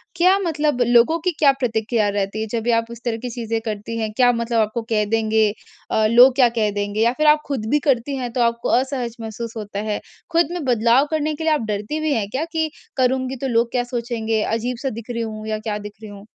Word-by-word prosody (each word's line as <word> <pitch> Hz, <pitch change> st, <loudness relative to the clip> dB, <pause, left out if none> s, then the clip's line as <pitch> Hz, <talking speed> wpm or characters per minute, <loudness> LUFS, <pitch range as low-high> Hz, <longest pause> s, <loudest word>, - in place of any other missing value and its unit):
क्या 365 Hz, +3 st, +4 dB
मतलब 300 Hz, -7 st, 0 dB
लोगों 240 Hz, +7 st, +4 dB
की 360 Hz, +2 st, 0 dB
क्या 285 Hz, -3 st, +6 dB
प्रतिक्रिया 220 Hz, -3 st, 0 dB
रहती 200 Hz, +1 st, -2 dB
है 220 Hz, -, -3 dB
जब 230 Hz, -1 st, -1 dB
भी 240 Hz, -, +1 dB
आप 230 Hz, 0 st, +2 dB
इस 235 Hz, 0 st, -10 dB
तरह 230 Hz, -2 st, -1 dB
की 250 Hz, -, -3 dB
चीज़ें 230 Hz, -2 st, -3 dB
करती 220 Hz, +1 st, -5 dB
हैं? 215 Hz, -1 st, -2 dB
क्या 245 Hz, -1 st, +5 dB
मतलब 235 Hz, 0 st, -1 dB
आपको 220 Hz, +2 st, 0 dB
कह 215 Hz, -2 st, +2 dB
देंगे? 220 Hz, 0 st, +2 dB, 0.4 s
अ, 220 Hz, -, +2 dB
लोग 250 Hz, +2 st, +7 dB
क्या 255 Hz, -2 st, +6 dB
कह 220 Hz, -2 st, 0 dB
देंगे 205 Hz, +1 st, -2 dB
या 235 Hz, +1 st, +4 dB
फिर 305 Hz, 0 st, +2 dB
आप 300 Hz, 0 st, +6 dB
खुद 265 Hz, -7 st, -3 dB
भी 295 Hz, -, +3 dB
करती 270 Hz, +2 st, +1 dB
हैं 245 Hz, -2 st, -4 dB
तो 245 Hz, -, 0 dB
आपको 235 Hz, 0 st, 0 dB
असहज 255 Hz, -3 st, -3 dB
महसूस 225 Hz, +1 st, -6 dB
होता 205 Hz, -2 st, -5 dB
है। 210 Hz, -, -1 dB, 0.3 s
खुद 335 Hz, -1 st, +2 dB
में 350 Hz, -2 st, -4 dB
बदलाव 240 Hz, +2 st, +3 dB
करने 310 Hz, 0 st, 0 dB
के 320 Hz, -, -6 dB
लिए 320 Hz, -, +3 dB
आप 300 Hz, -, 0 dB
डरती 210 Hz, +10 st, -3 dB
भी 310 Hz, -1 st, 0 dB
हैं 220 Hz, -6 st, -1 dB
क्या 270 Hz, +8 st, -2 dB
कि 320 Hz, -1 st, 0 dB, 0.3 s
करूँगी 260 Hz, 0 st, +1 dB
तो 270 Hz, -, -1 dB
लोग 235 Hz, -1 st, +1 dB
क्या 245 Hz, -1 st, 0 dB
सोचेंगे 235 Hz, -3 st, -2 dB
अजीब-सा 240 Hz, +4 st, -2 dB
दिख 230 Hz, 0 st, -8 dB
रही 235 Hz, -, -3 dB
हूँ 215 Hz, -1 st, -6 dB
या 215 Hz, 0 st, -2 dB
क्या 215 Hz, -1 st, -3 dB
दिख 210 Hz, 0 st, -8 dB
रही 215 Hz, -, -9 dB
हूँ? 200 Hz, 0 st, -12 dB
235 Hz, 240 wpm, -21 LUFS, 220-265 Hz, 0.4 s, लोग